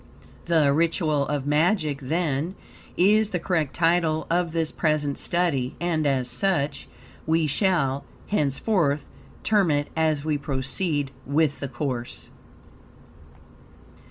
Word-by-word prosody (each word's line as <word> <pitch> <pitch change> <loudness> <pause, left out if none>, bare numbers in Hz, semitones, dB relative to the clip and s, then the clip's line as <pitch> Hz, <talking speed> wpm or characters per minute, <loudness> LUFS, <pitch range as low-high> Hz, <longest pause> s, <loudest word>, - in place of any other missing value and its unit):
The 155 -4 +3
ritual 160 -2 +1
of 145 -2 -2
magic, 150 -1 +1
then, 160 +3 -1 0.4
is 210 +3 +4
the 180 - -2
correct 165 -5 -1
title 165 -2 +2
of 175 -1 +1
this 165 -1 0
present 150 -3 0
study, 155 -8 0
and 165 -3 0
as 130 -3 +1
such, 140 +1 -1 0.4
we 160 0 +2
shall, 140 -4 +1 0.2
henceforth, 150 - 0 0.4
term 205 -5 +3
it 145 -1 0
as 155 -2 +1
we 150 -2 0
proceed 140 +2 -2 0.2
with 145 +1 +1
the 140 - -3
course. 125 -2 -5
155 Hz, 115 wpm, -25 LUFS, 140-170 Hz, 0.4 s, is